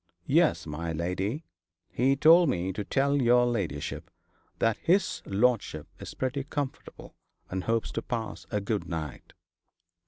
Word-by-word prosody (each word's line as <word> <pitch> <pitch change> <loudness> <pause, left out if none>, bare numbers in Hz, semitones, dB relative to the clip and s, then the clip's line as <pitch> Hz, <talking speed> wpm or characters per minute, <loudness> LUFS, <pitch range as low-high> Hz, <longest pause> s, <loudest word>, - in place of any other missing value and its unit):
'Yes, 160 - +3
my 80 +2 -4
lady. 95 - -2 0.5
He 135 +3 +2
told 160 +3 +6
me 95 -4 -1
to 105 - -3
tell 140 +6 +1
your 120 0 +5
ladyship 100 -12 -3 0.5
that 115 -2 +2
his 185 +2 +1
lordship 100 -7 +1
is - - -8
pretty 130 +1 -2
comfortable, 145 -1 -6 0.4
and 95 0 -3
hopes 115 0 0
to - - -3
pass 115 -3 -5
a 105 - -1
good 105 +1 -2
night.' 80 -4 -6
115 Hz, 135 wpm, -28 LUFS, 95-135 Hz, 0.5 s, told